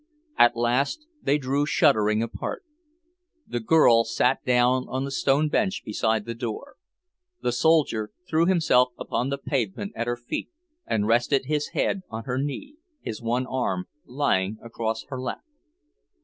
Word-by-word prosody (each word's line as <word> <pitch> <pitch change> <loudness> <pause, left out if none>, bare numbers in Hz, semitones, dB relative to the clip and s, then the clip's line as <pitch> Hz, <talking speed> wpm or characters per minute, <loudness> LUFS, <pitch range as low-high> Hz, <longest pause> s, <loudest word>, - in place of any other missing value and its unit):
At 120 - +5
last 130 - 0 0.2
they 145 -9 +2
drew 140 +1 0
shuddering 105 -5 +3
apart. 115 - -5 0.8
The 120 - -3
girl 115 -2 +5
sat 125 +3 +1
down 125 +1 +2
on 130 +1 -2
the 140 - -5
stone 140 +2 +2
bench 195 +6 0
beside 110 0 0
the 115 - -4
door. 115 +8 -6 0.7
The 125 - +1
soldier 125 -5 +2 0.2
threw 165 0 +2
himself 125 -9 +3
upon 125 +3 -2
the 140 - -1
pavement 135 - -2
at 115 - -3
her 120 0 -1
feet, 120 0 -5 0.4
and 105 -2 0
rested 120 +5 +2
his 150 +1 -1
head 195 - +1
on 110 0 -6
her 125 +1 -2
knee, 270 - -4 0.2
his 110 - -6
one 120 +2 0
arm 120 -9 -2 0.2
lying 110 -7 0
across 115 -1 -3
her 130 -2 -5
lap. 130 - -5
125 Hz, 150 wpm, -25 LUFS, 115-145 Hz, 0.8 s, At